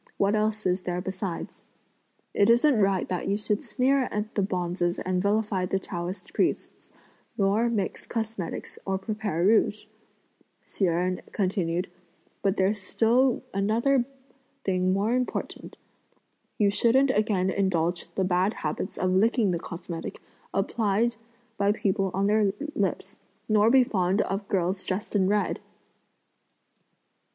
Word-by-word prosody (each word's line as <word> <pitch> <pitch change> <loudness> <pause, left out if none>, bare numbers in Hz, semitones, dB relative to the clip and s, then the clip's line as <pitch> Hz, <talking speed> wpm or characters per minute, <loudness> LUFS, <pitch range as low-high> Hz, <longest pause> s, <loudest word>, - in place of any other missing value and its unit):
What 200 +1 +2
else 215 0 0
is 180 +1 +1
there 180 -1 -2
besides?" 190 -1 -5 0.7
"It 200 - +3
isn't 245 +6 +5
right 195 -1 +2
that 180 -2 -2
you 200 +1 +1
should 210 0 0
sneer 265 0 +1
at 210 +1 -3
the 205 - +1
bonzes 175 -2 -1
and 185 0 -1
vilify 200 -2 +1
the 195 - 0
Taoist 180 0 -6
priests, - - -1 0.5
nor 205 +4 +2
mix 210 -5 -2
cosmetics 220 -6 -4
or 195 0 -1
prepare 200 -4 -2
rouge," 215 0 +3 0.8
Hsi 195 - -1
Jen 180 +1 0
continued; 180 -3 -1 0.5
"but 195 +1 +1
there's 195 +2 +1
still 235 +6 +2
another 230 +7 +2 0.6
thing 185 -1 +1
more 200 +5 +1
important, 250 0 -3 0.8
you 205 -2 +3
shouldn't 260 +6 +3
again 205 -5 +1
indulge 175 -3 0
the 190 - +1
bad 185 +3 +1
habits 155 +5 -4
of 185 - +1
licking 215 +2 +3
the 170 - -1
cosmetic, 170 -1 -7 0.3
applied 215 +3 +1 0.4
by 200 0 +3
people 195 -2 0
on 195 +2 0
their 205 -1 +3 0.2
lips, - - -2 0.3
nor 215 0 +4
be 260 +1 +6
fond 190 -3 +1
of 195 +1 -3
(girls 185 -1 0
dressed) 200 +3 -3
in 190 -2 +3
red!" 205 +1 +1
195 Hz, 135 wpm, -27 LUFS, 185-215 Hz, 0.8 s, be